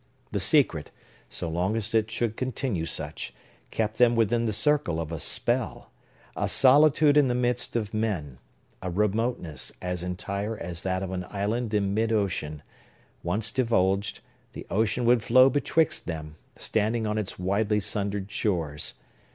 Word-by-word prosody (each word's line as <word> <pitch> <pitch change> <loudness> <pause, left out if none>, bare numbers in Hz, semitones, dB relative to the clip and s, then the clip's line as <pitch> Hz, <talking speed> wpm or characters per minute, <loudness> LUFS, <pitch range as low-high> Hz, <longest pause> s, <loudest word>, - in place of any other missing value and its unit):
The - - -1
secret, - - +3 0.4
so - - -4
long 90 +6 -1
as 115 +1 -4
it 110 -1 +2
should 110 0 -2
continue 125 -9 -2
such, 75 0 -5 0.3
kept 110 0 -2
them 120 -1 +5
within 115 +1 +2
the 110 - 0
circle 105 - +1
of 80 -1 -4
a 80 - -4
spell, - - 0 0.4
a - - -1
solitude 145 +2 +5
in 145 -2 +5
the 120 - 0
midst 125 0 0
of 110 -2 -2
men, 90 - -2 0.4
a 95 - -3
remoteness 105 - -1
as 90 -1 -3
entire 100 +4 -3
as 85 -2 -5
that 95 0 -1
of 95 - -4
an 90 -1 -4
island 105 +3 -2
in 100 -1 +1
mid 110 +2 +1
ocean; 90 -9 -1 0.6
once 105 +6 -1
divulged, 100 -5 +1 0.3
the - - -8
ocean 110 +4 +1
would 120 -1 +4
flow 130 +4 +6
betwixt 150 +2 +1
them, 80 -3 -5 0.2
standing 110 +1 -1
on 105 0 -1
its 100 -2 -4
widely 100 +3 +1
sundered 100 0 -3
shores. 85 -9 -2
105 Hz, 155 wpm, -27 LUFS, 90-115 Hz, 0.6 s, flow